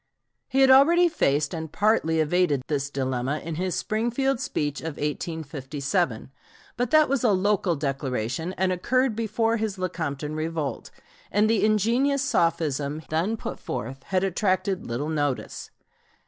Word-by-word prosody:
He 270 - +1
had 265 -1 +7
already 335 +7 +6
faced 145 - +1
and 160 -2 -5
partly 200 -7 +2
evaded 155 -3 +2
this 140 -2 -2
dilemma 130 0 -2
in 165 +1 -6
his 180 +2 -2
Springfield 240 +4 0
speech 145 - -2
of 160 -2 -5
1857, 145 - -2 0.4
but 245 -1 -1
that 310 +1 +5
was 270 -2 0
a 240 - +4
local 195 -2 +2
declaration 135 +2 -2
and 190 0 0
occurred 250 +6 +1
before 225 +1 0
his 215 -3 -2
Lecompton 155 -5 -3
revolt, 155 -4 -3 0.4
and 210 +1 +3
the 220 -3 +2
ingenious 235 +7 +2
sophism 155 - 0
then 175 +8 0
put - - -6
forth 130 +5 -5
had 185 -1 0
attracted 190 0 0
little 120 +6 -3
notice. 145 -4 -2
170 Hz, 140 wpm, -25 LUFS, 145-220 Hz, 0.4 s, had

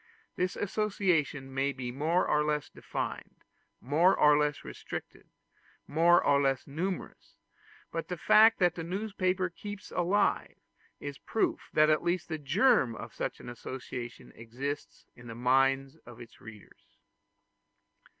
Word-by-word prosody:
This 180 0 -1
association 180 -10 -1
may 135 +1 0
be 130 -3 -5
more 160 +7 +1
or 150 0 +2
less 150 -1 -2
defined, - - -5 0.4
more 165 +9 +3
or 150 0 +6
less 150 0 0
restricted, - - -8 0.6
more 170 +3 +4
or 140 0 +4
less 135 -2 0
numerous; 175 +7 -5 0.6
but 165 - -4
the 180 - -4
fact 220 +7 +6
that 175 -3 +3
the 165 - -6
newspaper 185 0 -1
keeps 205 +3 -9
alive, 185 +4 +1 0.4
is 145 -1 -6
a - - -26
proof 225 - 0
that 155 0 +5
at 155 - +2
least 175 0 -1
the 160 -1 -3
germ 145 - +3
of - - -9
such - - -4
an - - -11
association 120 0 -7
exists 130 +6 -6
in 120 0 -13
the 115 - -7
minds 135 +2 +2
of 120 -1 -14
its 120 -2 -13
readers. 110 -2 -15
150 Hz, 140 wpm, -30 LUFS, 135-180 Hz, 0.6 s, or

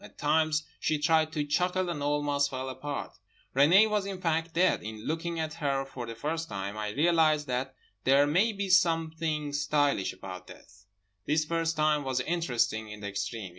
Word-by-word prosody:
At - - -14
times 155 +1 +2 0.2
she 155 - +1
tried 155 +1 +2
to 150 -3 -1
chuckle 180 +5 0
and 170 -4 -3
almost 145 -1 +1
fell 130 0 -4
apart. 145 +2 -5 0.4
Renée 170 +11 +6
was 210 -2 -1
in 195 -2 -5
fact 165 -1 0
dead. 185 +2 +3
In 110 0 -8
looking 165 +1 -2
at 155 -1 -3
her 135 -2 0
for 125 -3 -7
the 115 - -6
first 160 +7 -3
time, 100 +1 -4
I 105 0 -3
realised 155 +3 +3
that 130 0 -3 0.3
there 140 +2 +5
may 180 +10 +2
be 200 -1 -3
something 160 -4 +1
stylish 145 -6 +1
about 95 -1 -9
death. 95 0 -16 0.4
This 155 +1 +2
first 165 0 -1
time 155 -1 +2
was 130 -1 -1
interesting 125 -8 -1
in 105 0 -9
the 100 - -4
extreme. 100 0 -4
150 Hz, 180 wpm, -29 LUFS, 130-165 Hz, 0.4 s, Renée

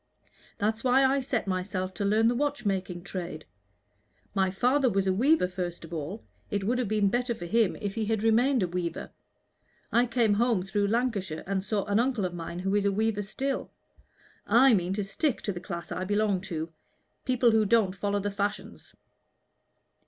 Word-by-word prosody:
That's 220 +1 -1
why 260 +1 +4
I 270 +1 +3
set 255 -3 -1
myself 185 0 -2
to 195 - -4
learn 215 +3 +3
the 240 - +3
watchmaking 205 -10 -2
trade. 175 -4 -6 0.9
My 190 -2 +2
father 255 +7 +2
was 195 -2 +1
a 190 - +2
weaver 260 - +3
first 180 -2 -5
of 165 - -11
all. 165 +7 -5 0.3
It 205 -2 -1
would 245 +5 0
have 245 - 0
been 210 -1 +2
better 245 +2 0
for 175 - -7
him 220 +2 +2
if 200 -1 -4
he 220 0 -2
had 220 0 -1
remained 240 +2 +3
a - - +1
weaver. 175 -1 -4 0.8
I 240 +1 +3
came 230 -3 +2
home 225 -3 +2
through 200 +1 0
Lancashire 205 -7 -1
and 190 0 -1
saw 200 0 -1
an 205 +1 +1
uncle 240 -5 +1
of 180 - -3
mine 170 0 -6
who 190 +2 -1
is 205 -1 +2
a 200 - +3
weaver 215 +1 0
still. 265 +7 -3 0.8
I 240 +4 +6
mean 185 -2 +1
to 205 +1 -1
stick 250 +7 -1
to 205 - -1
the 180 - -6
class 170 0 -7
I 185 - -2
belong 205 -1 +1
to 160 -1 -4 0.5
people 250 -2 +3
who 220 -1 +4
don't 210 -3 +3
follow 200 +1 -1
the 205 +1 -2
fashions." 205 +1 -4
205 Hz, 190 wpm, -28 LUFS, 185-235 Hz, 0.9 s, I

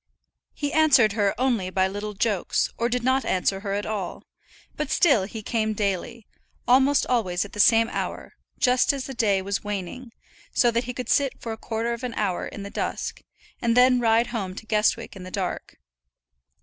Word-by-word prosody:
He 290 -1 -3
answered 285 -8 +5
her 205 -1 +1
only 240 -8 +1
by 190 0 +1
little 205 +2 -5
jokes, 205 -3 0
or 235 +1 0
did 245 0 -1
not 260 +1 +2
answer 190 +1 0
her 195 0 -4
at 205 +1 -2
all; 205 -5 -4 0.5
but - - -3
still 275 - +3
he 215 +2 -8
came 220 -1 -1
daily, 205 +3 -3 0.4
almost 265 +3 +4
always 195 -7 0
at 205 - -13
the 210 - -8
same 225 +2 +5
hour, - - -5 0.2
just 250 +2 +3
as 275 -2 -4
the 270 - -6
day 205 -5 +1
was 200 +1 -2
waning, 210 +5 -5 0.4
so 240 -2 +4
that 235 +1 -1
he 250 - -4
could 250 -2 -5
sit 275 -3 +1
for 230 - -5
a - - -3
quarter 225 +1 -3
of 235 - -7
an 245 -2 -4
hour 195 -4 -1
in 200 - -8
the 200 - -8
dusk, - - -4 0.4
and 235 0 +1
then 250 0 +6
ride 230 0 +3
home 190 -5 -3
to 220 - -9
Guestwick 220 +1 0
in 190 - -9
the 180 - -8
dark. 185 -1 -4
225 Hz, 195 wpm, -25 LUFS, 200-250 Hz, 0.5 s, then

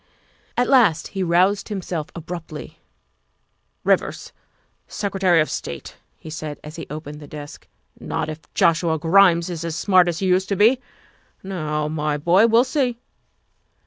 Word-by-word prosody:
At 245 - +2
last 215 - +4
he 195 - -4
roused 185 +4 +2
himself 180 -6 -4
abruptly. 165 -2 -8 0.5
" - - -48
Rivers, - - 0 0.5
Secretary 190 -4 +1
of 155 - 0
State," - - -6 0.2
he 155 - -10
said, 155 -1 -6
as 150 +1 -9
he 165 - -7
opened 150 0 -7
the 145 - -11
desk; 145 -1 -10
' - - -46
' - - -29
not - - -3
if 155 0 -9
Joshua 165 -1 +2
Grimes 170 +1 +4
is 170 -3 -5
as 165 -2 -3
smart 185 -1 +4
as 170 -2 -1
he 195 - -2
used 185 +1 +2
to 200 - +1
be. 225 +6 +4 0.6
Now, 155 -5 -2
my 150 -1 -1
boy, 175 +9 +4
we'll 230 +2 +5
see." 255 -3 -1
170 Hz, 160 wpm, -22 LUFS, 155-195 Hz, 0.6 s, we'll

